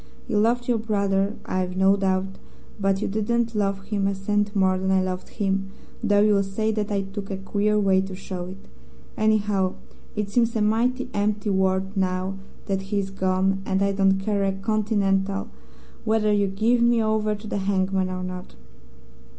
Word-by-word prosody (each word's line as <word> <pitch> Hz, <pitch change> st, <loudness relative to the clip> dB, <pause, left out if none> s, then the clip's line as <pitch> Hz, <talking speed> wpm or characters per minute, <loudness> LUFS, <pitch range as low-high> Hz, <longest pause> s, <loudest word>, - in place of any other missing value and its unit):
You 210 Hz, -, +1 dB
loved 240 Hz, +3 st, +2 dB
your 240 Hz, -2 st, +2 dB
brother, 200 Hz, -2 st, 0 dB
I've 185 Hz, 0 st, -2 dB
no 190 Hz, +1 st, +5 dB
doubt; 190 Hz, -1 st, -1 dB, 0.4 s
but 195 Hz, 0 st, +1 dB
you -, -, 0 dB
didn't 230 Hz, +3 st, 0 dB
love 195 Hz, -2 st, -1 dB
him 200 Hz, -1 st, -1 dB
a 200 Hz, -, 0 dB
cent 205 Hz, +2 st, -1 dB
more 190 Hz, -1 st, +3 dB
than 190 Hz, 0 st, -1 dB
I 190 Hz, 0 st, +4 dB
loved 185 Hz, 0 st, -3 dB
him, 195 Hz, -2 st, -1 dB, 0.3 s
though 205 Hz, -3 st, +3 dB
you'll 205 Hz, -1 st, +4 dB
say 200 Hz, +3 st, -1 dB
that 210 Hz, -1 st, -2 dB
I 200 Hz, -1 st, 0 dB
took 195 Hz, +1 st, -7 dB
a 195 Hz, -, -3 dB
queer 205 Hz, +2 st, 0 dB
way 190 Hz, -2 st, +3 dB
to 190 Hz, 0 st, -5 dB
show 185 Hz, -1 st, -6 dB
it. 185 Hz, +2 st, -8 dB, 0.6 s
Anyhow, 210 Hz, -3 st, +1 dB, 0.4 s
it 210 Hz, -1 st, -2 dB
seems 230 Hz, +1 st, +2 dB
a 220 Hz, -, +1 dB
mighty 245 Hz, +4 st, +1 dB
empty 205 Hz, 0 st, 0 dB
world 190 Hz, +1 st, +1 dB
now 185 Hz, 0 st, 0 dB, 0.3 s
that 195 Hz, -1 st, -1 dB
he 205 Hz, -, 0 dB
is 195 Hz, -1 st, -1 dB
gone, 190 Hz, 0 st, +1 dB
and 190 Hz, 0 st, 0 dB
I 200 Hz, -, +2 dB
don't 195 Hz, -1 st, +3 dB
care 200 Hz, 0 st, 0 dB
a 195 Hz, 0 st, +1 dB
continental 200 Hz, -1 st, 0 dB, 0.5 s
whether 215 Hz, -1 st, +2 dB
you 205 Hz, -1 st, +2 dB
give 220 Hz, +5 st, +2 dB
me 235 Hz, -1 st, +4 dB
over 215 Hz, -1 st, +1 dB
to 210 Hz, +2 st, -11 dB
the 205 Hz, -, -3 dB
hangman 190 Hz, -1 st, 0 dB
or 185 Hz, 0 st, -4 dB
not.' 185 Hz, 0 st, -7 dB
200 Hz, 185 wpm, -24 LUFS, 190-210 Hz, 0.6 s, no